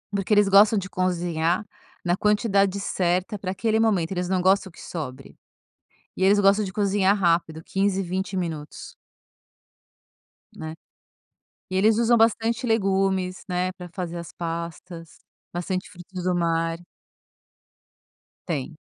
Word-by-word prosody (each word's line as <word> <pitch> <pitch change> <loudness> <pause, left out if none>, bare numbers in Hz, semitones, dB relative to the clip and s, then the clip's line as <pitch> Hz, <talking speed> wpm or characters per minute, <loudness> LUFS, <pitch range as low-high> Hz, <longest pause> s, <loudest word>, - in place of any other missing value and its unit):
Porque 195 +1 -2
eles 205 -1 +5
gostam 205 +2 +6
de 190 -2 -2
cozinhar 175 0 0 0.4
na 175 0 +2
quantidade 200 -1 +2
certa 185 +2 -1
para 185 - -4
aquele 220 +3 0
momento, 200 -7 +2
eles 180 -1 -2
não 185 -1 +1
gostam 190 0 +3
que - - -17
sobre. 140 -7 -7 0.8
E - - -1
eles 200 +2 +5
gostam 200 +1 +4
de 190 - -4
cozinhar 200 -1 +2
rápido, 165 -3 +1
15, 195 +1 0
20 190 +2 -3
minutos. 160 -4 -5 1.6
Né. 160 -5 -6 1.0
E 185 - -2
eles 215 +3 +4
usam 235 0 +4
bastante 230 +2 +2
legumes, 195 -4 +1
né, 180 0 -1
para 180 -1 -10
fazer 175 -2 -4
as 170 - -8
pastas. 170 0 -6 0.3
Bastante 185 +2 -3
frutos 180 -1 -9
do 180 -1 +1
mar. 165 -1 0 1.7
Tem. 155 -1 -3
185 Hz, 130 wpm, -24 LUFS, 175-200 Hz, 1.7 s, gostam